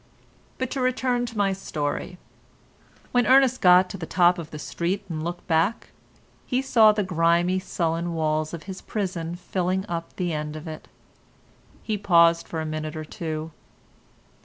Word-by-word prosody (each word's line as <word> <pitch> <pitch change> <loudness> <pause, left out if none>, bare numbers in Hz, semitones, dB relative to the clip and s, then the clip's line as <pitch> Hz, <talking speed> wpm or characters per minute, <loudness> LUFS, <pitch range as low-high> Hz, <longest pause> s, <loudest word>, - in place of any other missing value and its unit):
But 260 -1 -3
to 270 - -2
return 250 -1 0
to 230 -1 -8
my 200 -1 +2
story. 180 -1 -4 0.9
When 245 -1 +2
Ernest 260 -1 +5
got 180 0 +6
to 195 - -7
the 160 - -5
top 175 0 +3
of 165 -2 -7
the 150 - -8
street 175 +6 -3
and 160 -3 -4
looked 175 +1 -5
back, 170 +7 +1 0.6
he 250 - +1
saw 230 -5 +5
the 210 -1 0
grimy, 175 +1 +2
sullen 170 -2 -2
walls 155 -1 0
of 170 -2 -7
his 190 -1 -8
prison 175 -5 -3
filling 185 +1 -2
up 170 -3 -5
the 175 -3 -2
end 150 0 -4
of 155 +2 -8
it. 155 -1 -8 1.0
He 215 -2 -2
paused 170 -3 +4
for 160 - -4
a - - -4
minute 155 0 -4
or 155 0 -5
two. 160 0 -5
175 Hz, 165 wpm, -25 LUFS, 160-200 Hz, 1.0 s, got